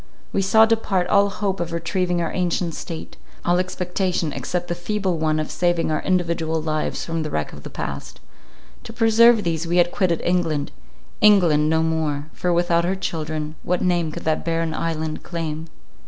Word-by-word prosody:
We 195 - +2
saw 220 +3 +6
depart 220 -5 +1
all 200 0 +4
hope 195 -1 -2
of 170 -1 -3
retrieving 175 +1 -1
our 165 - -3
ancient 175 -2 0
state—all 170 +2 -4
expectation, 180 -3 -1
except 175 -1 -3
the - - -1
feeble 185 0 -2
one 155 0 +1
of 155 - -3
saving 175 -2 +1
our 155 - 0
individual 170 -3 0
lives 155 -1 -2
from 165 -1 -2
the 155 - -3
wreck 75 - -3
of - - -10
the - - -8
past. 70 0 -6 0.7
To - - -8
preserve 225 0 +5
these 165 -1 -1
we 175 +1 +1
had 175 0 +4
quitted 175 -4 +1
England—England, 155 - +1
no 160 0 +2
more; 155 -2 -1
for 180 - -1
without 170 0 +2
her 185 +2 0
children, 155 -4 -3
what 180 0 -1
name 175 -3 +1
could - - -7
that 155 -1 0
barren 165 -1 -1
island 160 -1 -3
claim? 160 -2 -4
170 Hz, 170 wpm, -22 LUFS, 160-180 Hz, 0.7 s, saw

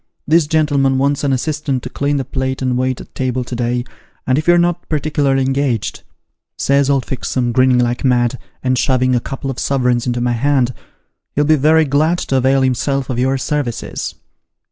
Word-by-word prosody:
This 155 0 +3
gentleman 145 -4 +2
wants 140 +2 0
an 140 - +1
assistant 140 -1 -1
to 125 - -5
clean 145 +1 -1
the 135 - -2
plate 130 +1 -3
and 130 -1 0
wait 130 0 -1
at - - -12
table 130 -1 -2
to 120 - -6
day, 120 0 -1 0.4
and 130 +2 +2
if 155 - -5
you're 175 0 +6
not 175 0 0
particu 150 -1 -1
larly 135 -1 +2
engaged,' 135 -4 -1 0.6
says 140 0 +2
old 135 -3 +1
Fixem, 125 -1 -2
grinning 130 +1 +3
like 120 0 0
mad, 125 -1 +1 0.2
and 130 -1 +1
shoving 130 -1 +2
a 120 - +3
couple 135 +2 -5
of 125 - -7
suverins 125 -3 0
into 120 0 -1
my 120 0 0
hand, 130 0 +1 0.3
' - - -55
he'll 145 - +3
be 155 +1 +4
very 155 +3 +4
glad 155 +5 +2
to 135 - -1
avail 135 +1 +3
himself 130 +1 0
of 120 - -2
your 130 +2 +1
services.' 135 -3 -3
135 Hz, 195 wpm, -17 LUFS, 125-145 Hz, 0.6 s, you're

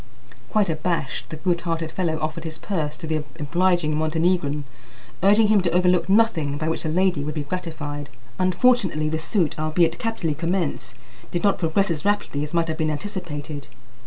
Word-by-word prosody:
Quite 215 -2 +2
abashed, 160 -2 -2
the - - -5
good 170 +2 0
hearted 165 -2 -2
fellow 170 -4 -1
offered 155 +1 -3
his 160 -1 -5
purse 155 -6 -3
to 165 - -7
the 160 0 0 0.2
obliging 170 +1 +2
Montenegrin, 155 -1 +1 0.6
urging 210 +3 +5
him 210 -2 +5
to 180 - +1
overlook 180 +1 +3
nothing 180 -10 +3
by 155 +1 -1
which 160 - -1
the 160 - -2
lady 180 -2 +2
would 150 +2 -4
be 150 - -1
gratified. 145 -3 -5 0.3
Unfortunately 185 -4 +3
the 160 0 -1
suit, 165 0 +1
albeit 160 +2 +2
capitally 225 -9 -1
commenced, 165 -4 -2 0.3
did 175 - -2
not 200 -1 +3
progress 175 +3 +1
as 155 -3 -2
rapidly 205 -8 0
as 150 - -5
might 170 -1 +1
have 160 -1 -2
been 155 -1 +1
anticipated. 150 -3 -5
165 Hz, 175 wpm, -23 LUFS, 155-185 Hz, 0.6 s, urging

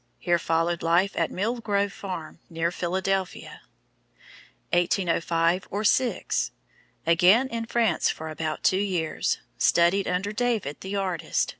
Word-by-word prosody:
Here 175 -1 +1
followed 165 +1 0
life 175 +4 +3
at - - +1
Mill 225 +6 -2
Grove 200 -3 0
Farm, 170 -5 -7
near 165 +1 -1
Philadelphia. 190 +2 -2 1.1
1805 175 0 +1
or 205 +2 -2
6 245 +3 +1 0.6
Again 180 +9 +5
in 230 -2 -4
France 225 -8 +2
for 160 - -4
about 155 0 -4
two 185 - +3
years. 180 -6 -1 0.2
Studied 175 +3 +3
under 185 +3 -1
David, 215 - -1
the 190 +1 -5
artist. 185 -4 -1
185 Hz, 125 wpm, -26 LUFS, 170-200 Hz, 1.1 s, Again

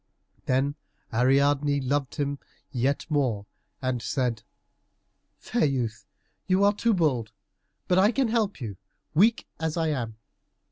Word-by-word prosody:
Then 135 +2 +2 0.4
Ariadne 140 +4 +3
loved 135 0 -1
him 140 -1 -2 0.3
yet 135 +2 0
more, 130 -10 0 0.4
and 130 -2 0
said, 120 -3 -1 1.0
"Fair 235 - 0
youth, 125 -6 -2 0.4
you 190 +1 +3
are 205 0 +5
too 225 +1 +2
bold, 130 -11 +1 0.6
but 180 0 +4
I 205 +4 +5
can 260 -1 +1
help 220 -5 0
you, 105 -7 -5 0.4
weak 215 +8 +4
as 160 0 -2
I 165 -1 +1
am. 120 -7 -2
140 Hz, 130 wpm, -27 LUFS, 125-180 Hz, 1.0 s, are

